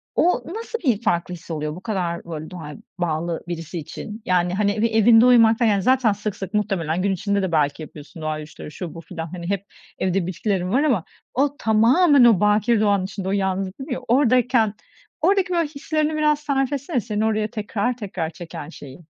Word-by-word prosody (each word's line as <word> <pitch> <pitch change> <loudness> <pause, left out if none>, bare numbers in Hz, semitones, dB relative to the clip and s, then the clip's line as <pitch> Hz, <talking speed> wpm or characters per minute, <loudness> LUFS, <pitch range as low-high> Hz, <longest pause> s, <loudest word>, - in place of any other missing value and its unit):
o 355 +2 +2
nasıl 460 +2 -5
bir 245 - +1
farklı 175 -5 0
hissi 165 -1 -8
oluyor, 150 0 -3
bu 180 - -10
kadar 180 -6 -2
böyle 160 -2 -6
doğaya 155 -5 -8 0.2
bağlı 170 0 -2
birisi 170 0 -5
için? 210 +8 -8
Yani, 180 -2 +1
hani, 205 +2 0
bir 230 0 +2
evinde 225 +1 +6
uyumak 230 -2 +6
da 235 - +3
yani, 205 -3 +3
zaten 255 0 +3
sık 205 0 -4
sık 195 0 -7
muhtemelen 185 -6 0
gün 195 +1 +1
içinde 200 +2 -1
de 190 -2 -2
belki 150 -1 +1
yapıyorsun 155 +2 -11
doğa 155 0 -2
yürüyüşleri 150 0 -9
şu, 175 +1 -7
bu 165 - -9
filan. 165 0 -7
Hani, 170 +1 -7
hep 200 -1 -2 0.3
evde 185 -1 0
bitkilerin 185 0 -1
var 275 +5 +3
ama 240 - +2 0.3
o 280 +2 +1
tamamen 250 +7 +5
o 230 -6 +6
bakir 210 +2 +3
doğanın 200 -3 +2
içinde 195 0 -6
o - - 0
yalnızdır 195 +7 -2
ya, 250 - -1
oradayken, 245 -3 +3 0.5
oradaki, 375 +1 +2
böyle, 335 -2 +1
hislerini 310 +1 -2
biraz 300 -1 +1
tarif 270 -1 0
etsene, 280 0 -1
seni 215 -1 -2
oraya 215 -1 +1
tekrar 220 +2 -2
tekrar 185 -7 -4
çeken 165 -2 -9
şeyi. 135 +2 -11
205 Hz, 195 wpm, -22 LUFS, 175-245 Hz, 0.5 s, evinde